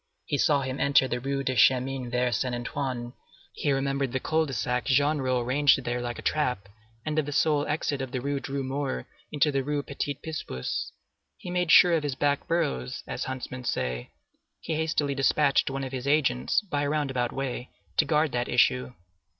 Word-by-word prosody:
He 145 - -1
saw 145 -2 +3
him 130 +1 -4
enter 140 -1 +4
the 120 -1 -2
Rue 140 +2 -2
du 130 -1 -1
Chemin 130 +1 +3
Vert 125 0 +1
Saint 125 -1 -1
Antoine; 120 0 -4 0.4
he 145 - -1
remembered 135 -1 0
the 130 - 0
Cul 160 +3 +1
de 135 - -5
Sac 125 +1 -1
Genrot 135 -2 +2
arranged 140 +2 +4
there 120 0 -2
like 120 0 -4
a - - -8
trap, 125 -10 0 0.4
and 155 0 0
of 150 - -1
the - - -3
sole 145 0 +2
exit 145 -2 -1
of 130 -2 -5
the 130 - -2
Rue 140 +2 -2
Droit 135 0 -4
Mur 135 - -3 0.3
into 150 0 +2
the 135 -1 0
Rue 145 +1 -1
Petit 140 0 -3
Picpus. 150 - -4 0.5
He 175 - -7
made 180 -1 0
sure 175 -1 +8
of 165 - +2
his 145 -3 -2
back 145 0 0
burrows, 145 - -1
as - - -4
huntsmen 130 -1 -5
say; 60 - -2 0.5
he - - -4
hastily 155 -2 0
despatched 140 +1 +3
one 135 0 -3
of 130 - -5
his 130 0 -4
agents, 135 - +2
by 160 -9 -2
a 145 - 0
roundabout 135 -5 0
way, 130 -2 -4 0.3
to - - +4
guard 155 -1 +2
that 120 0 -1
issue. 125 +1 +2
135 Hz, 195 wpm, -27 LUFS, 125-145 Hz, 0.5 s, sure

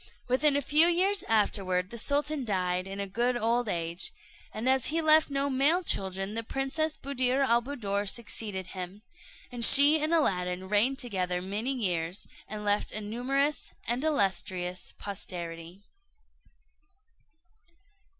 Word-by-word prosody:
Within 275 +3 +2
a 285 - +1
few 305 +6 +5
years 370 +3 +2
afterward, 190 -4 0
the 235 - -7
sultan 290 +3 0
died 185 -4 -1
in 195 +1 -7
a 200 - -2
good 240 +5 -1
old 235 0 0
age, 170 0 -2 0.4
and 220 +4 -4
as 260 -1 +4
he 325 +2 0
left 315 -1 +5
no 275 0 -1
male 280 +7 +2
children, 195 - -1
the 230 - -2
Princess 270 +6 -2
Buddir 265 -1 0
al 235 0 +3
Buddoor 205 -6 -3
succeeded 210 -4 -3
him, 185 +2 -7 0.5
and 240 -1 -3
she 290 +5 +8
and 310 +2 -1
Aladdin 185 - 0
reigned 215 +7 +2
together 185 -7 -2
many 205 +8 -3
years, 180 -6 -2 0.2
and 210 0 -7
left 205 0 0
a 215 - -2
numerous 260 +7 -1
and 240 +4 -1
illustrious 190 - -1
posterity. 175 -2 -7
225 Hz, 140 wpm, -28 LUFS, 190-275 Hz, 0.5 s, she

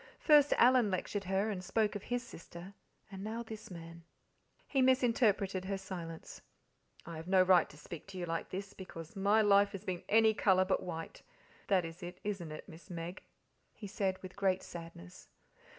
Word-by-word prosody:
First 295 -2 +5
Alan 245 -3 +5
lectured 200 +1 -2
her 195 +3 +1
and 185 -3 -4
spoke 210 +3 +1
of 205 - -3
his 245 +3 -2
sister, 170 +3 -11 0.4
and 195 0 -7
now 225 +2 -4
this 220 -2 -9
man. 170 -1 -10 0.6
He 270 - +1
misinterpreted 225 -7 +3
her 195 0 -2
silence. 175 -4 -8 0.6
"I 170 -1 -7
have 160 +2 -8
no 185 0 +5
right 185 -1 +5
to 150 - -14
speak 155 +2 -9
to 190 -1 -9
you 180 - -2
like 165 -1 -3
this, 195 +1 -5
because 165 -2 -9
my 205 +3 +4
life 200 0 +5
has 195 0 -6
been 180 -2 -3
any 220 0 +5
colour 185 -3 +3
but 190 - +1
white 165 -2 -6 0.5
that 185 -4 +3
is 165 +1 -9
it, 180 +1 -7
isn't 195 -6 -3
it, 155 - -8
Miss 165 -4 -13
Meg?" 170 +1 -6 0.5
he 210 - -9
said 190 -1 -1
with 185 - -9
great 190 -2 +1
sadness. 165 - -10
190 Hz, 180 wpm, -34 LUFS, 175-210 Hz, 0.6 s, First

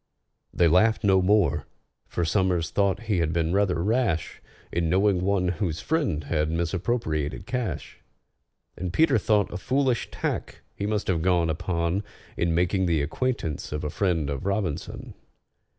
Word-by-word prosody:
They 85 - +3
laughed 110 +8 +3
no 95 -2 +4
more, 95 -4 +2 0.4
for 85 - -1
SOMERS 90 -2 +1
thought 100 +1 +1
he 105 -5 0
had 80 -2 +1
been 85 0 0
rather 95 -4 +1
rash 105 -6 0 0.3
In 85 -1 0
knowing 95 +1 +3
one 95 -1 +1
whose 85 -3 -2
friend 130 - 0
had 75 +1 0
misappropriated 85 -1 -1
cash; 125 0 -4 0.8
And 90 -1 -4
PETER 155 - +3
thought 105 -1 +1
a - - -3
foolish 130 +3 0
tack - - -4
he 100 - -3
must 105 -1 -1
have 85 -4 0
gone 85 -2 +2
upon 85 +2 -1 0.3
In 85 -1 0
making 90 +2 +1
the 80 -4 +2
acquaintance 80 - -2
of 75 0 -3
a 75 - -2
friend 85 -7 0
of 70 +7 -4
ROBINSON. 100 -6 -3
90 Hz, 150 wpm, -26 LUFS, 80-105 Hz, 0.8 s, no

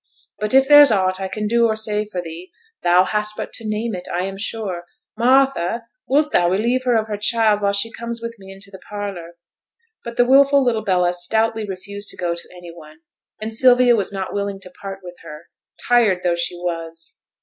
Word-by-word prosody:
But 215 +4 -1
if 270 0 +5
there's 290 0 +8
aught 185 -3 +1
I 190 - -2
can 210 +3 -4
do 235 +2 +3
or 220 - 0
say 215 -1 -1
for 185 -4 -5
thee, 170 +2 -8 0.3
thou 175 +1 +4
hast 210 +2 -1
but - - -6
to 225 - -5
name 215 +2 -2
it, 180 -1 -7
I 175 +1 -1
am 195 +1 -4
sure. 195 -4 -4 0.3
Martha! 245 -4 +2 0.2
wilt 295 +3 +2
thou 175 -1 +3
relieve 235 +7 0
her 245 -2 +2
of 220 -1 +1
her 210 -2 -4
child 215 0 +2
while 200 -1 +2
she 200 +3 +1
comes 235 0 -6
with 230 0 -6
me 195 0 -12
into 195 +1 -12
the 190 - -11
parlour?' 190 -5 -7 0.7
But 235 0 -8
the 245 - +4
wilful 275 +2 +5
little 230 -4 0
Bella 180 -3 +1
stoutly 220 +4 -1
refused 200 +2 -7
to - - -5
go 175 -1 -1
to 170 - -3
any 175 -1 -11
one, 155 -1 -15 0.4
and 220 +1 -5
Sylvia 245 +1 +5
was 200 -3 -2
not 195 -1 -5
willing 200 -1 -3
to 185 - -10
part 195 +1 -9
with 175 -1 -10
her, 150 +2 -12 0.4
tired 225 -7 +3
though 175 -1 +2
she 170 +1 -1
was. 165 -2 -6
205 Hz, 210 wpm, -20 LUFS, 180-230 Hz, 0.7 s, there's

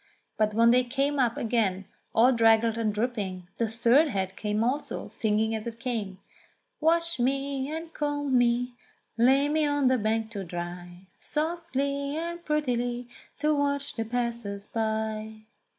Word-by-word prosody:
But 215 -1 +1
when 230 +1 +6
they 250 +1 +5
came 275 +4 0
up 240 -3 +2
again 210 -5 0 0.3
all 240 +4 +6
draggled 225 -1 +4
and 225 -2 0
dripping, 205 -5 -3
the 230 - +2
third 235 +7 +4
head 190 -6 -2
came 210 +1 -1
also, 270 +5 -2
singing 220 0 0
as 220 +1 -3
it 230 0 -6
came: 225 -7 -3 0.6
"Wash 335 -1 +2
me, 270 +2 0
and 325 +1 -6
comb 290 -2 -1
me, 245 0 +2 0.4
lay 265 +4 +4
me 310 +1 +1
on 290 -2 +2
the 255 -1 +2
bank 220 +1 0
to 200 -3 -4
dry 175 +1 -7
Softly 290 -3 -2
and 340 +1 -4
prettily 245 -5 -1 0.3
to 305 0 +3
watch 285 -1 0
the 225 - -2
passers 230 -4 -3
by." 220 -1 -3
240 Hz, 150 wpm, -27 LUFS, 220-280 Hz, 0.6 s, when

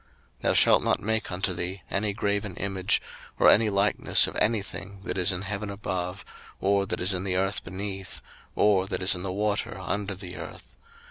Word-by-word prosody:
02:020:004 - - -32
Thou - - +2
shalt - - +5
not - - +2
make 110 0 -1
unto 95 +1 -1
thee 90 +2 -4
any 105 +1 0
graven 100 -2 -2
image, 95 0 0 0.3
or - - +5
any 110 0 +5
likeness 100 0 +3
of - - -6
any 110 -2 +2
thing 100 0 -7
that - - -3
is 90 0 +3
in 90 +1 -4
heaven 105 +1 -4
above, 95 -2 -4 0.3
or 100 0 +2
that - - -2
is 90 +2 +3
in 90 0 -2
the 95 -2 -1
earth 95 +2 0
beneath, 95 0 -5 0.4
or 100 -2 +3
that 95 - -3
is 90 - +6
in 90 - -3
the 95 0 -3
water 105 +2 -1
under 100 -1 -3
the 90 -1 -8
earth. - - -10
100 Hz, 200 wpm, -27 LUFS, 95-100 Hz, 0.4 s, is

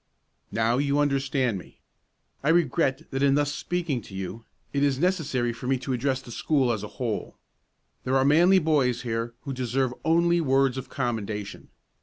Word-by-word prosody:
"Now 115 +3 +1
you 140 0 +1
understand 135 -6 +1
me. - - -15 0.7
I 145 - +2
regret 160 -3 +1
that 135 0 -2
in 140 -1 +4
thus 145 0 +1
speaking 170 -6 -2
to 100 - -12
you 95 +4 -6 0.3
it 140 - 0
is 140 -2 +2
necessary 145 -8 0
for 120 +2 -7
me 135 0 +2
to 130 +1 -3
address 130 +1 -1
the 120 - -11
school 135 0 +1
as 110 -3 -2
a 105 - -5
whole. 120 -5 -3 0.7
There 130 +1 +1
are 135 - +3
manly 170 +7 +6
boys 145 -8 +2
here 115 0 -3
who 140 - -5
deserve 130 0 -1
only 170 +1 +3
words 135 -3 +2
of 130 - -9
commendation. 110 -6 -4
135 Hz, 175 wpm, -26 LUFS, 120-145 Hz, 0.7 s, manly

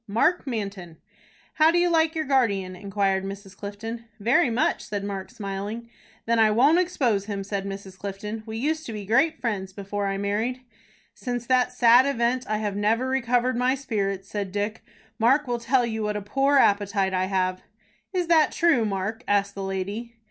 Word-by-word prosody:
"Mark 255 - +1
Manton." 200 -8 -5 0.6
"How 315 0 +5
do 340 - +2
you 350 0 +3
like 325 -1 +2
your 315 -1 -1
guardian?" 200 -9 +1
inquired 195 0 0
Mrs. 195 0 -8
Clifton. 225 +3 -7
"Very 245 - +3
much," 235 +2 0
said 205 -1 -4
Mark, 195 -2 -5
smiling. 215 +1 -6 0.3
"Then 230 0 +2
I 220 -1 +6
won't 275 +10 +4
expose 250 - +1
him," 200 -2 -4
said 195 0 -3
Mrs. 195 -1 -8
Clifton. 205 +2 -5
"We 220 0 -5
used 310 +6 -1
to 230 - -5
be 210 -2 -6
great 235 +10 +2
friends 195 -5 -3
before 200 +1 -3
I 195 0 -1
married." 215 +6 -1 0.5
"Since 245 -2 -4
that 255 0 +2
sad 245 +2 +6
event 245 -1 0
I 215 - +1
have 210 -2 -2
never 220 +5 +1
recovered 250 -1 +1
my 250 +2 +2
spirits," 200 -7 -3
said 200 -2 -4
Dick. 205 +2 -3 0.4
"Mark 265 +6 +4
will 240 -1 -2
tell 245 +1 +2
you 220 -1 -3
what 210 0 -1
a - - -4
poor 275 +6 +2
appetite 200 -4 +2
I 185 0 +1
have." 185 -1 -1 0.5
"Is 360 -2 0
that 325 -2 +4
true, 335 -9 +3
Mark?" 205 +3 -3
asked 200 0 +1
the 200 - -6
lady. 200 +5 -4
220 Hz, 185 wpm, -25 LUFS, 200-250 Hz, 0.6 s, I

